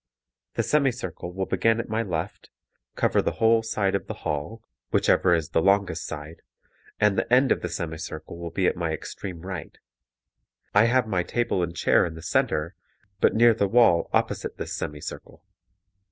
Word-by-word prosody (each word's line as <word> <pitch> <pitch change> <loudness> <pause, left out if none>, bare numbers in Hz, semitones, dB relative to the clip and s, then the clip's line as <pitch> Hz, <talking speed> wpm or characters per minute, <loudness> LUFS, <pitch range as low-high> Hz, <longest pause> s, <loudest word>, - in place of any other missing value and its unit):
The - - +1
semi 140 -3 +2
circle 90 -7 -7
will 95 +1 -3
begin 110 +5 +1
at 115 - -3
my 110 +1 -1
left, 85 -7 -4 0.5
cover - - +2
the - - -1
whole 115 0 +3
side 105 -3 -1
of 100 - -2
the - - -5
hall 105 +11 -3 0.3
whichever 90 -2 +3
is 80 -3 -2
the 80 - +1
longest 95 -5 +1
side 75 +1 -8 0.6
and 105 -2 +3
the - - -3
end 130 +2 +5
of - - +2
the 90 - -3
semi 80 -1 -4
circle 80 0 -7
will 85 0 -5
be 95 +2 -1
at - - +2
my 85 -2 -2
extreme 85 +1 -7
right. 90 -2 -7 1.0
I 100 +2 +6
have 125 +1 +3
my 95 -5 0
table 115 +1 -1
and 85 -1 -3
chair - - +3
in 85 -2 -3
the 80 - -10
center, 80 +1 0 0.5
but - - +3
near 115 +1 +6
the 100 -2 +1
wall 110 -6 +4
opposite - - -1
this - - -5
semi 75 0 -5
circle. - - -9
95 Hz, 185 wpm, -25 LUFS, 85-115 Hz, 1.0 s, I